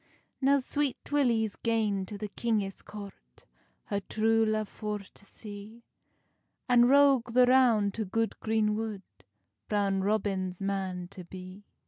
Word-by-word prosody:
Now 275 Hz, +1 st, +4 dB
Sweet 280 Hz, +1 st, -2 dB
Willy's 235 Hz, -7 st, +2 dB
gane 215 Hz, -4 st, 0 dB
to 205 Hz, -, -6 dB
the 210 Hz, 0 st, -5 dB
kingis 205 Hz, -3 st, -2 dB
court, 200 Hz, -, -12 dB, 0.4 s
Her 200 Hz, -, -2 dB
true 225 Hz, +2 st, +1 dB
love 215 Hz, -1 st, 0 dB
for 210 Hz, 0 st, -4 dB
to 200 Hz, 0 st, -15 dB
see, 210 Hz, +3 st, -11 dB, 0.8 s
And 245 Hz, -2 st, +6 dB
Roge 270 Hz, -2 st, +5 dB
the 250 Hz, 0 st, +6 dB
Roun 245 Hz, -5 st, +4 dB
to 220 Hz, +2 st, -3 dB
good 225 Hz, +4 st, -1 dB
green 220 Hz, -1 st, +1 dB
wood, 215 Hz, -2 st, -4 dB, 0.7 s
Brown 200 Hz, -2 st, +1 dB
Robin's 190 Hz, -3 st, -1 dB
man 190 Hz, -2 st, -3 dB
to 185 Hz, -1 st, -10 dB
be. 185 Hz, +3 st, -11 dB
215 Hz, 135 wpm, -29 LUFS, 195-230 Hz, 0.8 s, And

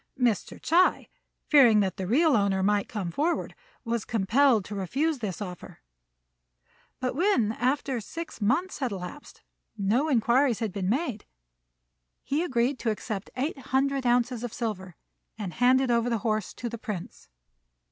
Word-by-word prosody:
Mr. 235 Hz, -6 st, 0 dB
Ts'ui, 355 Hz, +3 st, +2 dB, 0.4 s
fearing 245 Hz, -8 st, +6 dB
that 195 Hz, -1 st, 0 dB
the 190 Hz, -2 st, -3 dB
real 295 Hz, -, +4 dB
owner 200 Hz, -2 st, +1 dB
might 205 Hz, 0 st, +1 dB
come 195 Hz, -6 st, -4 dB
forward, 315 Hz, -, -1 dB, 0.3 s
was 230 Hz, -1 st, -1 dB
compelled 225 Hz, +1 st, +2 dB
to 210 Hz, -, -7 dB
refuse 270 Hz, -, -1 dB
this 205 Hz, -6 st, -4 dB
offer; 180 Hz, -3 st, -9 dB, 1.2 s
but 255 Hz, -1 st, -2 dB
when, 300 Hz, -, +2 dB
after 255 Hz, +1 st, -1 dB
six 330 Hz, +2 st, -8 dB
months 285 Hz, -, 0 dB
had 260 Hz, -5 st, -1 dB
elapsed, 190 Hz, +9 st, -8 dB, 0.3 s
no 225 Hz, +10 st, +1 dB
inquiries 245 Hz, 0 st, +3 dB
had 220 Hz, -5 st, -3 dB
been 190 Hz, -2 st, -2 dB
made, 255 Hz, -3 st, -2 dB, 1.0 s
he 290 Hz, +3 st, 0 dB
agreed 255 Hz, -3 st, 0 dB
to 235 Hz, -, -1 dB
accept 215 Hz, -1 st, -4 dB
eight 280 Hz, +2 st, -2 dB
hundred 270 Hz, +1 st, 0 dB
ounces 245 Hz, 0 st, +1 dB
of 245 Hz, -, -4 dB
silver, 190 Hz, -7 st, -4 dB, 0.4 s
and 195 Hz, -6 st, -5 dB
handed 255 Hz, +3 st, +3 dB
over 235 Hz, 0 st, +2 dB
the 230 Hz, -, +1 dB
horse 215 Hz, -3 st, 0 dB
to 240 Hz, -, -5 dB
the 235 Hz, -1 st, -6 dB
Prince. 210 Hz, -7 st, -7 dB
235 Hz, 150 wpm, -27 LUFS, 205-270 Hz, 1.2 s, fearing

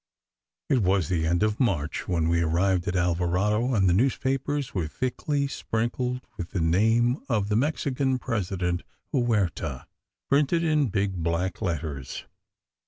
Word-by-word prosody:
It 135 Hz, -, +3 dB
was 95 Hz, -5 st, +2 dB
the 80 Hz, -3 st, +1 dB
end 85 Hz, +4 st, +2 dB
of 105 Hz, 0 st, 0 dB
March 80 Hz, -, 0 dB
when 80 Hz, -3 st, +1 dB
we 85 Hz, 0 st, +2 dB
arrived 90 Hz, +3 st, +1 dB
at 100 Hz, -, -1 dB
Alvarado, 90 Hz, +7 st, +1 dB
and 95 Hz, -3 st, +3 dB
the 90 Hz, -, +4 dB
newspapers 135 Hz, +5 st, 0 dB
were 85 Hz, -5 st, -1 dB
thickly 140 Hz, -, -1 dB
sprinkled 125 Hz, 0 st, -2 dB, 0.2 s
with 90 Hz, -1 st, -5 dB
the 95 Hz, -, 0 dB
name 115 Hz, -, +3 dB
of 105 Hz, -4 st, +1 dB
the 105 Hz, -, +1 dB
Mexican 135 Hz, 0 st, +1 dB
President 95 Hz, -7 st, -2 dB, 0.3 s
Huerta, 100 Hz, -, 0 dB, 0.4 s
printed 150 Hz, +4 st, +2 dB
in 155 Hz, -4 st, +2 dB
big, 95 Hz, -3 st, -1 dB
black 85 Hz, +4 st, -1 dB
letters. 75 Hz, -8 st, -3 dB
100 Hz, 140 wpm, -26 LUFS, 85-125 Hz, 0.4 s, the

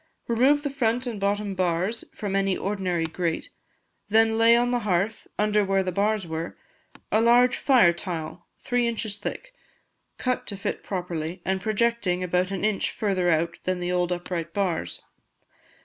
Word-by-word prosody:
Remove 265 Hz, +5 st, +3 dB
the 285 Hz, -, -2 dB
front 250 Hz, -2 st, 0 dB
and 230 Hz, -4 st, -4 dB
bottom 200 Hz, 0 st, 0 dB
bars 185 Hz, +4 st, -1 dB
from 200 Hz, -2 st, -3 dB
any 195 Hz, -1 st, +1 dB
ordinary 185 Hz, -4 st, -1 dB
grate; 165 Hz, 0 st, -3 dB, 0.6 s
then 225 Hz, +1 st, +4 dB
lay 230 Hz, +1 st, +6 dB
on 245 Hz, +1 st, +2 dB
the 245 Hz, -, +1 dB
hearth, 205 Hz, +1 st, -1 dB
under 210 Hz, 0 st, +2 dB
where 195 Hz, 0 st, +1 dB
the 185 Hz, -, -2 dB
bars 205 Hz, +1 st, 0 dB
were, 160 Hz, 0 st, -5 dB, 0.5 s
a 215 Hz, -, +3 dB
large 245 Hz, +2 st, +5 dB
fire 240 Hz, -11 st, +5 dB
tile, 170 Hz, -1 st, -6 dB
three 245 Hz, -1 st, 0 dB
inches 220 Hz, -3 st, -2 dB
thick, -, -, -6 dB, 0.6 s
cut 255 Hz, -1 st, -1 dB
to 200 Hz, -, -4 dB
fit 195 Hz, -, -4 dB
properly, 175 Hz, -3 st, -4 dB
and 190 Hz, 0 st, 0 dB
projecting 215 Hz, -4 st, 0 dB
about 180 Hz, +1 st, +1 dB
an 195 Hz, +1 st, -2 dB
inch 215 Hz, -2 st, +1 dB
further 190 Hz, -4 st, 0 dB
out 165 Hz, 0 st, +1 dB
than 185 Hz, -1 st, 0 dB
the 175 Hz, 0 st, -2 dB
old 180 Hz, 0 st, 0 dB
upright 175 Hz, -2 st, -4 dB
bars. 175 Hz, -, -2 dB
195 Hz, 165 wpm, -25 LUFS, 180-225 Hz, 0.6 s, lay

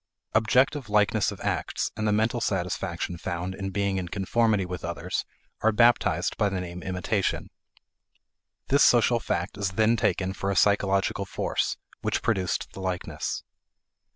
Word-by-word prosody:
Objective 125 Hz, +3 st, +2 dB
likeness 105 Hz, 0 st, +2 dB
of -, -, -9 dB
acts -, -, -1 dB
and 110 Hz, 0 st, -1 dB
the -, -, +3 dB
mental 110 Hz, +3 st, +1 dB
satisfaction 90 Hz, -3 st, -2 dB
found 90 Hz, +1 st, -3 dB
in 95 Hz, 0 st, -4 dB
being 100 Hz, 0 st, 0 dB
in 90 Hz, -2 st, -3 dB
conformity 105 Hz, +2 st, +1 dB
with 90 Hz, -2 st, -6 dB
others -, -, -3 dB, 0.4 s
are 110 Hz, -, +4 dB
baptized 120 Hz, +2 st, +3 dB
by 105 Hz, -, +2 dB
the 95 Hz, -1 st, -2 dB
name 90 Hz, 0 st, -6 dB
imitation. 95 Hz, +2 st, -1 dB, 1.2 s
This 140 Hz, +1 st, +5 dB
social 120 Hz, 0 st, +5 dB
fact 90 Hz, -1 st, -3 dB
is 95 Hz, -2 st, -1 dB
then 110 Hz, +3 st, +3 dB
taken 95 Hz, -3 st, 0 dB
for 100 Hz, 0 st, -3 dB
a 100 Hz, -, 0 dB
psychological 100 Hz, 0 st, +2 dB
force, -, -, -1 dB, 0.2 s
which -, -, -1 dB
produced 95 Hz, -5 st, -1 dB
the -, -, -9 dB
likeness. 90 Hz, -1 st, -3 dB
100 Hz, 150 wpm, -26 LUFS, 95-110 Hz, 1.2 s, This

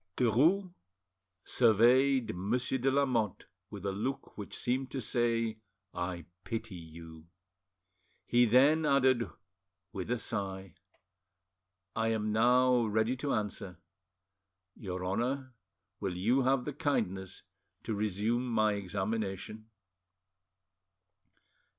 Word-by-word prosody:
Derues 160 Hz, -, +3 dB, 0.7 s
surveyed 125 Hz, +2 st, +4 dB
Monsieur 125 Hz, +8 st, -1 dB
de 130 Hz, +2 st, +2 dB
Lamotte 130 Hz, -7 st, 0 dB, 0.2 s
with 100 Hz, -2 st, -8 dB
a 100 Hz, -, 0 dB
look 130 Hz, +8 st, -4 dB
which 105 Hz, -, -7 dB
seemed 130 Hz, +2 st, -1 dB
to 135 Hz, -, -4 dB
say, 115 Hz, -2 st, 0 dB, 0.3 s
"I 90 Hz, -1 st, -4 dB, 0.2 s
pity 115 Hz, -3 st, -5 dB
you." 80 Hz, -1 st, -11 dB, 1.0 s
He 120 Hz, 0 st, +4 dB
then 140 Hz, +7 st, +5 dB
added, 130 Hz, -4 st, +3 dB, 0.6 s
with 95 Hz, -1 st, -5 dB
a 125 Hz, -, +1 dB
sigh— 95 Hz, -5 st, -4 dB, 1.2 s
"I 110 Hz, 0 st, +1 dB
am 110 Hz, -1 st, 0 dB
now 125 Hz, +2 st, +4 dB
ready 110 Hz, +4 st, +1 dB
to 140 Hz, +2 st, -2 dB
answer. 105 Hz, -4 st, -3 dB, 1.0 s
Your 90 Hz, -2 st, -5 dB
Honour, 130 Hz, +7 st, -2 dB, 0.5 s
will 95 Hz, -3 st, -3 dB
you 120 Hz, +9 st, +2 dB
have 130 Hz, 0 st, +2 dB
the 150 Hz, -, -4 dB
kindness 95 Hz, -, -2 dB, 0.4 s
to 110 Hz, -, -3 dB
resume 105 Hz, +4 st, -1 dB
my 110 Hz, -3 st, +2 dB
examination?" 100 Hz, +2 st, -4 dB
115 Hz, 105 wpm, -31 LUFS, 100-130 Hz, 1.2 s, then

